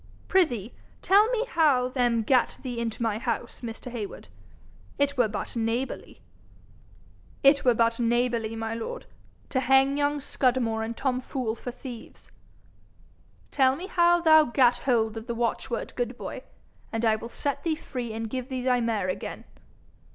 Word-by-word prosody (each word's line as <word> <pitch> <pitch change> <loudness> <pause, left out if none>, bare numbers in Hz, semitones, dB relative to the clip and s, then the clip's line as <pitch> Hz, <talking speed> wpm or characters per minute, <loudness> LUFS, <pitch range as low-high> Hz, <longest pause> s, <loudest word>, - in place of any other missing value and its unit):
'Prithee 250 - +1 0.3
tell 405 +3 +5
me 485 -1 0
how 295 - +3
them 245 -3 +1
gat 255 +2 +2
thee 245 -3 -4
into 235 0 -3
my 220 -2 0
house, 235 -1 -3
Mr. 235 +1 -7
Heywood? 220 -4 -7 0.7
It 285 0 +1
were 245 -4 +3
but 210 +3 -5
neighbourly.' 230 +3 -3 1.2
'It 280 +1 +5
were 245 -2 +4
but 230 +1 +2
neighbourly, 235 -1 0
my 225 0 -3
lord, 230 - -5 0.4
to 260 - 0
hang 270 +2 +4
young 290 0 +1
Scudamore 245 -5 0
and 225 +1 -4
Tom 255 -2 0
Fool 250 -3 -3
for 235 - -7
thieves.' 245 -1 -10 1.2
'Tell 260 -1 +3
me 345 +6 -6
how 345 -2 +3
thou 315 -2 +7
gat 245 -1 +3
hold 225 -4 +1
of 225 +2 -7
the 235 - -3
watchword, 235 0 -2
good 245 0 -3
boy, - - -6 0.5
and 225 +1 -1
I 220 -1 +4
will 230 +2 -7
set 280 +2 -3
thee 320 +1 0
free, 250 -6 -6
and 225 +1 -4
give 255 +3 -5
thee 255 -2 -3
thy 250 -1 +2
mare 225 -5 0
again.' 185 - -4
245 Hz, 160 wpm, -27 LUFS, 230-275 Hz, 1.2 s, thou